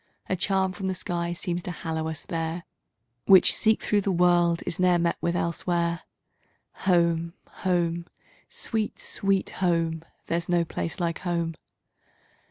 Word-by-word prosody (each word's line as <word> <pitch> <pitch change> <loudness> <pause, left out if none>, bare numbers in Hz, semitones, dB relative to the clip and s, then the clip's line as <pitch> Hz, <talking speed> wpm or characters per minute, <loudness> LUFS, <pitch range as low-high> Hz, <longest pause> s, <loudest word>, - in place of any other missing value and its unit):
A 185 - 0
charm 190 0 +1
from 190 +1 -5
the 190 - -1
skies 175 -1 -3
seems 175 -2 -2
to 175 - -6
hallow 160 -1 -3
it 160 -2 -5
there, 165 +1 -3 0.6
Which, 190 -2 +8
seek 220 -1 +3
through 205 -1 +2
the 195 - 0
world, 175 -1 +3
is 175 - -3
not 180 -1 +4
met 170 0 +1
with 170 0 0
elsewhere. 170 0 -1 0.9
Home, 170 -1 +2
home! 170 -2 -1 0.4
Sweet, 220 -2 -2
Sweet 195 -1 0
Home! 165 -2 +1 0.2
There's 170 +1 -2
no 175 -1 +2
place 165 +1 -4
like 170 -2 -1
Home! 170 -2 -1
175 Hz, 145 wpm, -26 LUFS, 170-185 Hz, 0.9 s, Which